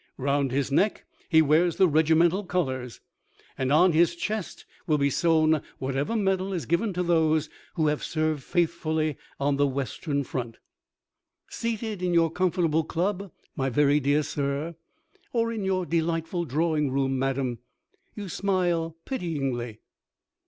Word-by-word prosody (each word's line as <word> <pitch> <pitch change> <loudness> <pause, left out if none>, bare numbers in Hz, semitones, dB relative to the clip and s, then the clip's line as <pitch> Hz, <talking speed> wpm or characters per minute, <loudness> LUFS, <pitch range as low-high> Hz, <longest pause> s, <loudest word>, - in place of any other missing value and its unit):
Round 140 0 0
his 140 +1 -1
neck 200 +9 +1 0.2
he 160 -2 +6
wears 160 +4 +3
the 190 -2 +5
regimental 165 +4 +3
colours, 130 -10 -3 0.5
and 130 0 -1
on 175 +5 +5
his 170 +1 +3
chest 210 +2 -4 0.2
will 155 - +3
be 140 -1 +1
sewn 160 -2 +3 0.2
whatever 135 +10 -2
medal 195 -2 0
is 170 -4 -3
given 180 +7 +1
to 180 +1 -1
those 160 -3 +2 0.2
who 160 - +1
have 150 0 0
served 155 -2 -1
faithfully 160 -2 0 0.2
on 140 0 +1
the 145 0 +3
Western 140 +2 -2
Front. 120 -3 -5 0.9
Seated 220 -3 -3
in 180 -1 0
your 165 -1 +4
comfortable 170 -3 +1
club, 190 +4 -2 0.2
my 135 -3 0
very 145 +3 +3
dear 145 +2 +2
sir, 145 +4 -3 0.6
or 230 -1 +1
in 215 -3 -3
your 190 -1 0
delightful 165 +2 -1
drawing 155 0 0
room, 135 0 0
madam, 130 -3 -1 0.6
you 205 -2 -6
smile 175 -4 0
pityingly.... 135 - -3
160 Hz, 140 wpm, -26 LUFS, 140-180 Hz, 0.9 s, he